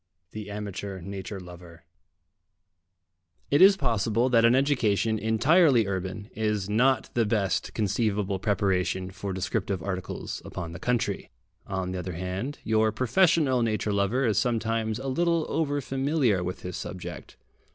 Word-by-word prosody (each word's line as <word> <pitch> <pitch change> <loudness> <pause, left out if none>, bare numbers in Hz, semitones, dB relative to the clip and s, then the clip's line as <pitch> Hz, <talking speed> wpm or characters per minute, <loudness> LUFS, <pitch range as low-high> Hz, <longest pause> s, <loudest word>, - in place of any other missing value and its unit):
THE 105 -1 -7
AMATEUR 100 -2 -5
NATURE 100 +1 -6
LOVER 85 -2 -12 1.7
It 145 - +4
is 195 +1 +8
possible 115 - +1
that 115 -2 +4
an 115 +2 +5
education 115 -6 +2
entirely 120 - +4
urban 95 +2 -4
is 105 -3 -1
not 120 +3 +2
the 120 - +2
best 105 -3 -1
conceivable 105 -2 0
preparation 95 -2 0
for 95 +1 -5
descriptive 95 -1 -2
articles 95 -1 -4
upon 85 -2 -6
the 85 - -8
country. 120 -5 -1 0.4
On 95 -2 -3
the 95 - -3
other 90 0 -5
hand, 95 - -4
your 110 0 +2
professional 130 - +3
nature 110 -2 0
lover 100 +7 +1
is 110 -3 +2
sometimes 115 -2 0
a 135 +2 -6
little 170 +4 +1
over 145 -3 0
familiar 135 - +1
with 90 +1 -5
his 90 -1 -5
subject. 90 -1 -7
110 Hz, 140 wpm, -27 LUFS, 95-125 Hz, 1.7 s, is